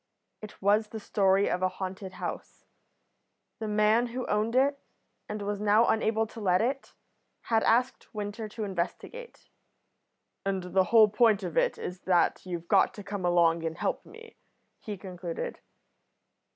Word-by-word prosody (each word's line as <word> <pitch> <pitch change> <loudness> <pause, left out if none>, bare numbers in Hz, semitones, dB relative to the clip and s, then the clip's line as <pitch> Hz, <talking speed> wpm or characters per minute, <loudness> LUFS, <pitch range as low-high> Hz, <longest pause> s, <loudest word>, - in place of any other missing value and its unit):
It 215 -1 -10
was 210 +2 +3
the 220 +1 -7
story 195 -1 +2
of 180 - -1
a 185 - +2
haunted 190 0 -6
house. - - -7 0.9
The 220 - -4
man 215 +3 +3
who 250 +2 -4
owned 215 +3 0
it, 280 +2 +3 0.5
and 210 -1 -4
was 205 0 -3
now 210 +2 +4
unable 220 0 +1
to 225 - -11
let 185 -3 +2
it, 265 +4 -2 0.5
had 225 -1 +1
asked 245 +3 +1
Winter 210 0 -5
to 220 +1 -6
investigate. 205 - -5 0.9
"And 190 -2 -3
the 190 -1 +4
whole 220 +2 +6
point 210 -1 +3
of 175 -4 -5
it - - +2
is 180 0 -6
that 180 -2 +2
you've 170 -2 -5
got - - +3
to 205 - -8
come 200 -1 -4
along 170 -1 +3
and 165 0 -3
help - - -2
me," 460 +1 -15 0.4
he 210 -2 -6
concluded. 180 -3 -6
205 Hz, 155 wpm, -28 LUFS, 185-225 Hz, 0.9 s, whole